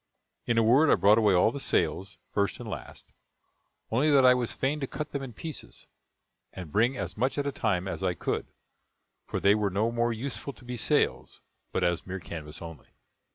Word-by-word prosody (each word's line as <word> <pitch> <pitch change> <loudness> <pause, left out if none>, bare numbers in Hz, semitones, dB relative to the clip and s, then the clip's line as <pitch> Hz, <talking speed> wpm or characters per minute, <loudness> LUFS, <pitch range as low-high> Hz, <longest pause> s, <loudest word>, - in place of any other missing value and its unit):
In 120 - +1
a 115 - +5
word, 135 +7 +5
I - - +6
brought 105 +3 +5
away 105 -4 +4
all 90 +5 +4
the 140 - -5
sails, 95 - -1 0.2
first 100 -2 0
and - - -7
last; - - -8 0.8
only 135 +7 +3
that 140 -3 +5
I 125 - +8
was 125 -2 -1
fain 140 +3 -1
to 135 - -3
cut 150 +3 -5
them 140 - -3
in 135 -2 -6
pieces, 155 +6 -8 0.7
and 90 -5 -8
bring 120 - +2
as - - -4
much 130 +6 0
at 145 - 0
a 140 - 0
time 95 -8 -1
as 95 - -4
I 90 -2 0
could, - - -2 0.8
for - - -2
they 100 - +5
were 105 -1 +1
no 105 +5 0
more 120 0 +1
useful 135 +4 -5
to 125 - -16
be 125 0 -5
sails, 120 - 0 0.3
but - - -1
as 85 0 0
mere 95 +1 -4
canvas 80 -1 -8
only. 80 -5 -10
115 Hz, 205 wpm, -28 LUFS, 95-135 Hz, 0.8 s, I